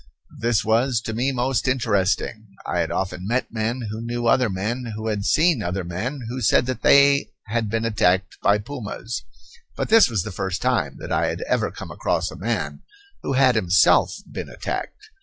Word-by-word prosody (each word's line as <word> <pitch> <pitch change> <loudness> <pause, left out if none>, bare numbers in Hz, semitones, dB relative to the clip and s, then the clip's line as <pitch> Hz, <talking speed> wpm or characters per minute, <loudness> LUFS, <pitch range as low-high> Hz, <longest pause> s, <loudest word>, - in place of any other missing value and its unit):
This 120 -2 +1
was 115 +2 +2
to 110 - -5
me 125 +5 0
most 130 -1 0
interesting. 110 -3 0 0.2
I 90 - -1
had 85 - 0
often 90 0 -3
met 120 +2 -1
men 115 +1 -2
who 110 +1 -5
knew 120 +1 -3
other 120 0 +3
men 110 +5 -3
who 110 +1 -3
had 105 -2 -2
seen 160 -6 +3
other 95 0 -2
men 110 +12 -4
who 125 +2 -4
said 120 +2 +3
that 130 0 -3
they 140 0 +5 0.2
had 110 0 -1
been 115 +1 -1
attacked 95 -4 +1
by 100 - +4
pumas, 115 -1 -6 0.5
but - - -3
this 225 - +7
was 105 -7 -1
the 105 - -6
first 95 0 -3
time 125 0 0
that - - -8
I - - +2
had - - -3
ever - - 0
come - - -9
across - - -1
a - - -9
man - - -3 0.4
who - - -2
had 130 -1 +5
himself 95 -5 +4
been - - -6
attacked. 430 +1 -6
115 Hz, 190 wpm, -23 LUFS, 105-130 Hz, 0.5 s, this